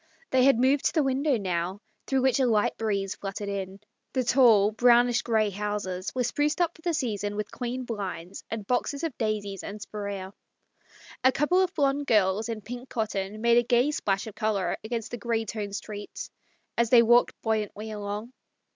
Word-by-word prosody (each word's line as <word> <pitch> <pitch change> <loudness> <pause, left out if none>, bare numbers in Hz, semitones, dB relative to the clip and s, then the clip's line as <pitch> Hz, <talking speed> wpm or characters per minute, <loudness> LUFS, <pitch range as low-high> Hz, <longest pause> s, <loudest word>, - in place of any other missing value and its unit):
They 260 -1 +4
had 275 -4 +5
moved 265 +3 +3
to - - +2
the 310 - +4
window 270 0 +1
now, 185 -1 -2 0.3
through 265 -1 +1
which 265 +1 +3
a 260 - +3
light 215 -3 +2
breeze 200 -3 -1
fluttered 200 +1 -5
in. 195 -1 -4 0.3
The 260 - +1
tall, 230 -5 +5
brown 240 +2 +5
ish 245 - +1
grey 220 -3 +1
houses 200 -2 -3
were 255 - +1
spruced 295 +6 0
up 345 -2 +2
for - - -17
the 340 -1 0
season 205 -7 -2
with 210 -1 -4
clean 250 +1 -4
blinds 195 -6 -5
and 220 -2 -4
boxes 255 +6 -1
of 325 -6 -2
daisies 210 -4 -2
and 205 +1 -6
spirea. 200 -3 -6 0.9
A 260 - +6
couple 325 +8 +2
of 370 0 0
blond 280 -1 +1
girls 210 +1 +2
in 225 -2 -4
pink 245 +4 -8
cotton 215 -2 -3
made 235 0 +5
a - - +1
gay 245 +4 +3
splash 195 -9 -1
of 220 - -8
colour 215 -4 0
against 225 0 -4
the 240 - -5
grey 225 +1 -1
toned 205 -2 -4
street 205 0 -7 0.5
as 235 -1 +3
they 235 -1 +7
walked 240 +1 +4
buoyantly 220 -1 -2
along. 210 +3 -5
220 Hz, 190 wpm, -27 LUFS, 205-250 Hz, 0.9 s, they